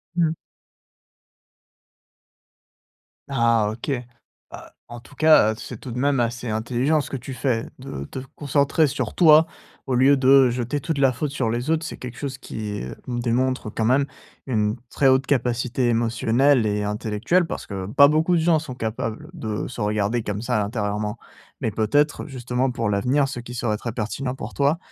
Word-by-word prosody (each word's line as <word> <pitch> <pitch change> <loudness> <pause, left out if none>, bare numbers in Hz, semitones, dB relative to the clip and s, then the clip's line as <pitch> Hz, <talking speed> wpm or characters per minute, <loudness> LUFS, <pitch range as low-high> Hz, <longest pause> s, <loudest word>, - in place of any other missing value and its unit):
Mmh. 165 -2 +2 2.9
Ah, 115 -3 +2
OK. 115 +6 -7 0.6
Ah, - - -11 0.2
en 120 0 -9
tout 135 +4 -17
cas, 155 -8 +5
heu, - - -9
c'est 120 -1 -8
tout 125 - -8
de 120 - -5
même 140 +1 +1
assez 120 +1 -1
intelligent 120 +7 0
ce - - -8
que 135 - -3
tu 130 +2 -8
fais 125 -3 -1
de 125 - -6
te 130 - -7 0.2
concentrer 145 +2 +2
sur 140 - -3
toi 160 -2 +7 0.4
au 130 - 0
lieu 135 +3 +5
de 135 -1 +5
jeter 125 +4 -2
toute 145 0 -3
la 135 -2 +4
faute 140 +4 -3
sur 130 -5 -1
les 120 +6 -1
autres. 160 0 +1
C'est 165 - -6
quelque 125 -1 -8
chose 135 -3 -4
qui 105 -5 -5 0.2
démontre 125 -1 -1
quand 110 - -2
même 130 +4 +3 0.4
une 105 -4 0 0.2
très 135 - +2
haute 130 0 +4
capacité 125 -1 0
émotionnelle 115 +2 +2
et 105 0 -1
intellectuelle 105 - 0
parce - - -6
que 95 -2 -5
pas 140 +7 +6
beaucoup 155 +4 +2
de 165 - +2
gens 165 -1 +3
sont 140 -5 -7
capables 115 +4 -4
de 110 -11 -4
se 125 - -7
regarder 105 +2 0
comme 105 0 -4
ça 120 -4 0
intérieurement. 105 0 -2 0.4
Mais 110 - -1
peut-être 145 +10 +1
justement 125 -1 -2
pour 115 -3 -2
l'avenir 125 +8 +2
ce 135 -3 -5
qui 120 +1 -8
serait 115 -3 -1
très 115 - -5
pertinent 125 +4 -3
pour - - -7
toi. 140 +3 +2
125 Hz, 175 wpm, -23 LUFS, 110-140 Hz, 2.9 s, toi